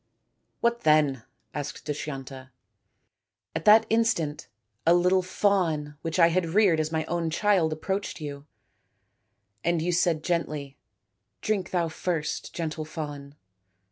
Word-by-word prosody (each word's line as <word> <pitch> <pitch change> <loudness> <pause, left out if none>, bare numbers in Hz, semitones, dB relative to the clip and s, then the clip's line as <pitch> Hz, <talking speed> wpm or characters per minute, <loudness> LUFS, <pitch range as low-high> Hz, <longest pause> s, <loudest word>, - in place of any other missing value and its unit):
" - - -49
What 235 0 +1
then? 150 -6 +3
" - - -46
asked 145 -1 -5
Dushyanta. 135 -3 -6 0.5
" - - -54
At 160 - -3
that 220 +1 +7
instant 215 -10 0 0.4
a 170 +1 +5
little 180 +1 +3
fawn 180 -6 0
which 165 +1 -3
I 170 -2 +6
had 175 0 +1
reared 195 -7 +5
as 155 0 -1
my 160 -1 -1
own 170 0 -1
child 180 -1 +2
approached 190 +7 -3
you, 145 -1 -7 1.2
and 170 0 +1
you 170 +3 0
said 170 -2 +1
gently, 150 -5 -2 0.3
* 100 +2 -53
Drink 200 -5 0
thou 175 -2 0
first, 160 -1 -3
gentle 160 -2 -4
fawn.' 145 -3 -7
160 Hz, 140 wpm, -27 LUFS, 150-180 Hz, 1.2 s, that